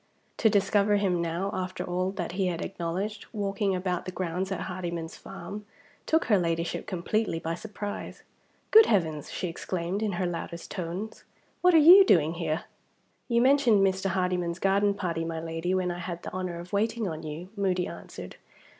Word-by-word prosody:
To 220 - +4
discover 205 0 +3
him 190 -4 +1
now, 170 +4 -2
after 185 0 -3
all 180 +1 -1
that 180 -4 -4
he 185 +1 0
had 170 -2 -2
acknowledged, 195 +4 -4
walking 200 -2 0
about 180 -1 -2
the 185 - -4
grounds 185 +1 -3
at 195 - -2
Hardyman's 170 -3 -4
farm, 205 +2 -8 0.4
took 320 +1 +3
her 210 -4 +4
Ladyship 170 -1 -2
completely 190 +1 -1
by 165 0 -3
surprise. 205 +2 -6 0.5
"Good 440 0 +9
Heavens!" 160 -8 0
she 185 - -3
exclaimed, 175 +3 -3
in 210 -3 0
her 180 +1 -1
loudest 170 -1 -5
tones, 185 +4 -5 0.4
"what 360 -1 +5
are - - +9
you 350 +6 +10
doing 165 - +4
here?" 165 -2 -2 0.6
"You 235 -1 +3
mentioned 255 -7 +5
Mr. 190 0 0
Hardyman's 180 -2 0
garden 200 +1 +2
party, 170 -4 -2
my 165 0 -3
Lady, 165 +3 -2
when 185 -1 0
I 175 - -5
had 175 -1 -5
the - - -7
honor 185 -2 -3
of 175 +3 -10
waiting 220 +1 0
on 160 -2 -4
you," 160 +3 -7
Moody 185 -3 0
answered. - - -9
185 Hz, 175 wpm, -28 LUFS, 170-200 Hz, 0.6 s, you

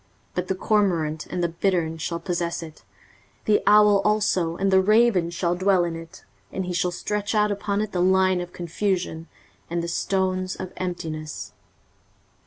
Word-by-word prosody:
23:034:011 - - -38
But 180 0 -2
the 190 - 0
cormorant 175 -7 +1
and 180 - -3
the 170 - +1
bittern 170 -2 0
shall 170 +2 -3
possess 170 -2 -2
it; 160 -1 -11 0.6
the 210 - +3
owl 210 -1 +6
also 205 -6 +1
and 195 0 +1
the 190 0 +6
raven 215 -3 +4
shall 170 0 -1
dwell 185 0 +3
in 170 -1 -2
it: 165 +2 -11 0.3
and 190 - -3
he 180 - -3
shall 180 +1 +1
stretch 205 +4 -3
out 210 0 +3
upon 200 0 -1
it 215 -1 -3
the 180 - -1
line 185 0 +3
of 175 0 -7
confusion, 175 -2 -2 0.4
and 170 0 -2
the - - -3
stones 185 +1 -1
of 185 - -7
emptiness. 160 -4 -5
185 Hz, 175 wpm, -24 LUFS, 170-200 Hz, 0.6 s, owl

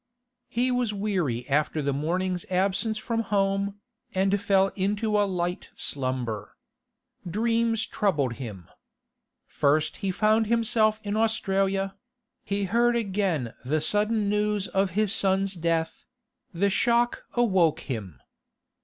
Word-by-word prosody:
He 250 +2 0
was 245 -4 0
weary 175 - -1
after 150 +2 +1
the 140 -1 0
morning's 180 +5 -1
absence 195 +4 +1
from 230 +1 -2
home, 200 -1 0 0.4
and 195 +1 +2
fell 195 -1 +3
into 205 +3 -1
a 205 -1 +3
light 175 -1 -2
slumber. 125 -6 -3 0.7
Dreams 225 +3 +1
troubled 145 - 0
him. 100 -8 -7 0.8
First 150 +2 +1
he 195 - -2
found 215 +3 +2
himself 220 -1 +2
in 205 0 -2
Australia; 195 -3 +1 0.5
he 200 0 -1
heard 235 +5 +2
again 190 - -1
the 150 +5 0
sudden 210 +6 +1
news 210 -1 0
of 195 0 +1
his 215 -1 +2
son's 195 -1 +1
death; 165 -2 -2 0.4
the 195 +3 +1
shock 240 +3 +2
awoke 190 -10 +3
him. 100 - -6
195 Hz, 120 wpm, -26 LUFS, 165-215 Hz, 0.8 s, fell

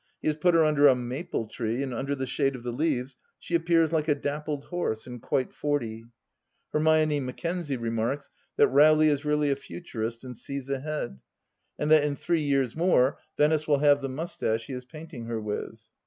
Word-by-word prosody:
He - - -4
has 150 - 0
put 175 +2 +3
her 165 - +6
under 145 -1 +5
a 135 - +6
maple 125 +1 -3
tree, 115 +3 -2
and 130 -2 -4
under 140 +3 -2
the 135 -1 -3
shade 135 +1 0
of 120 - -9
the 120 - -3
leaves 130 -2 -1 0.2
she - - -9
appears 165 -1 +3
like 155 -2 0
a 150 - +3
dappled 145 0 -3
horse, 175 -11 -2
and 125 -2 -8
quite 130 +2 -1
forty. 115 -7 -2 0.7
Hermione 155 -1 +3
Mackenzie 145 +3 -3
remarks 115 +4 -2 0.2
that - - +5
Rowley 155 +2 +6
is 145 0 0
really 150 -1 +2
a - - +2
Futurist 115 -6 -6
and 125 -1 -8
sees 140 +2 -6
ahead, 140 - -3 0.6
and 150 +1 -1
that 155 -2 +7
in 145 -1 0
three 165 +2 0
years 135 -4 +1
more 160 -6 +3 0.2
Venice 155 +1 +2
will 145 -2 +4
have 145 0 +4
the 135 - -3
moustache 130 -6 -2
he 140 - -7
is 125 0 -6
painting 155 -4 -9
her 115 -1 -3
with. 105 +1 -4
140 Hz, 195 wpm, -27 LUFS, 125-155 Hz, 0.7 s, that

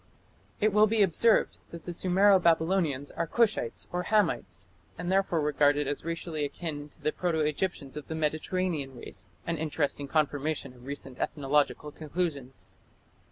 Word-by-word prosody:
It 215 -1 +2
will 210 +1 +6
be 215 -1 +4
observed 210 +5 +3
that 170 -1 -10
the 175 - -4
Sumero 190 +3 +4
Babylonians 160 -4 +2
are 165 - -2
Cushites 215 - +1
or 180 - -1
Hamites, 215 +1 +1 0.3
and 175 - -3
therefore 190 -4 +2
regarded 145 -1 +3
as 145 0 -3
racially 165 -2 -3
akin 145 0 -4
to 150 - -27
the 150 - +2
proto 175 -1 -1
Egyptians 150 -2 -2
of 150 - -7
the 160 - -4
Mediterranean 155 -2 -1
race 95 -4 -8 0.2
an 165 -2 -2
interesting 145 -2 -1
confirmation 145 -2 0
of 125 +1 -15
recent 140 -2 -6
ethnological 150 +1 0
conclusions. 140 - -4
155 Hz, 150 wpm, -29 LUFS, 145-180 Hz, 0.3 s, will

